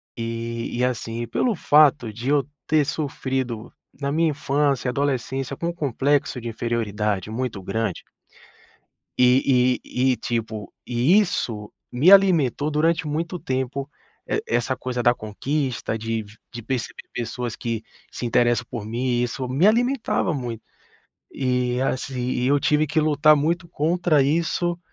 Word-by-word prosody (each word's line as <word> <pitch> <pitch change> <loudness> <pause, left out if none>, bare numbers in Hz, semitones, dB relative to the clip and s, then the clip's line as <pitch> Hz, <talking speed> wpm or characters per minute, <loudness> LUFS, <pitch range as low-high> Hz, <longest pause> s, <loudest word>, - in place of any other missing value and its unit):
E 115 0 -4
e 125 - +1
assim, 115 -2 -3
e - - -6
pelo 220 - 0
fato 145 -8 +4
de 120 +5 -4
eu 145 -1 +2 0.2
ter 155 -2 +3
sofrido, 130 -6 -3 0.3
na 140 0 -1
minha 165 +1 +2
infância, 140 -3 0
adolescência, 135 0 -2
com 170 - -3
um 170 - -2
complexo 140 -3 0
de 120 - -6
inferioridade 105 -4 -2
muito 115 -4 -3
grande 100 0 -2 1.2
e 125 0 +4
e 130 +1 +1
e - - -1
tipo, 110 -3 -4
e 125 - +4
isso 115 - -2 0.2
me 140 +10 +4
alimentou 165 -7 +5
durante 160 +2 +1
muito 165 +4 -2
tempo, 130 0 -3 0.4
e - - -1
essa 120 +2 0
coisa 125 -1 -3
da 120 0 +5
conquista, 120 +2 -3
de 115 0 -2
v 105 0 -15 0.2
de 120 -2 -7
perceber 125 0 -4
pessoas 120 0 -4
que 115 -3 -3 0.3
se - - -6
interessam 120 +1 +2
por 105 -3 -5
mim, 120 +2 -1
isso 125 +2 -3
me 140 +10 +3
alimentava 240 -4 +2
muito. 120 -6 -4 0.7
E 125 -1 0
assim, 130 -1 -2
e 125 0 0
eu 145 +1 +3
tive 150 +1 +2
que 155 +2 +1
lutar 150 0 +5
muito 170 +4 0
contra 165 -1 +2
isso, 170 +3 0
130 Hz, 145 wpm, -23 LUFS, 120-150 Hz, 1.2 s, alimentou